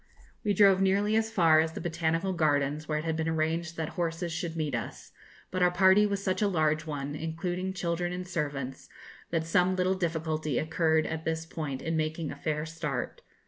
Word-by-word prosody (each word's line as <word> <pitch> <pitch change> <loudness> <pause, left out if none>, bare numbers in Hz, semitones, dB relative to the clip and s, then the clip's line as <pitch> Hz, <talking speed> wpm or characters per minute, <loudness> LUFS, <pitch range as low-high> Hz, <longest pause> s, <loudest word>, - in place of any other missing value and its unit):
We 205 -1 +1
drove 195 -1 +6
nearly 200 +3 +2
as 225 0 +2
far 165 -7 +5
as 160 0 +1
the - - -5
Botanical 165 +2 -1
Gardens, 150 -2 +1
where 150 - 0
it 155 - -3
had 160 -1 0
been 160 0 -1
arranged 165 +1 -1
that 160 -1 -2
horses 170 -1 -2
should 170 -1 -3
meet 155 -4 -2
us; 115 -2 -5 0.4
but 185 - -2
our 180 - +6
party 190 +3 +5
was 200 -1 -2
such 185 +1 0
a 210 - +4
large 160 -3 +1
one, 145 -1 -4
including 175 +4 -3
children 175 -1 -2
and 180 0 -5
servants, 145 -6 -4 0.4
that 165 -1 -1
some 180 +2 +2
little 185 0 +2
difficulty 160 -5 -1
occurred 160 0 +2
at 160 0 -4
this 160 0 -2
point 150 -5 -5
in 165 0 -1
making 155 0 -2
a - - -6
fair 150 +1 -2
start. 160 -1 -4
165 Hz, 195 wpm, -29 LUFS, 155-180 Hz, 0.4 s, drove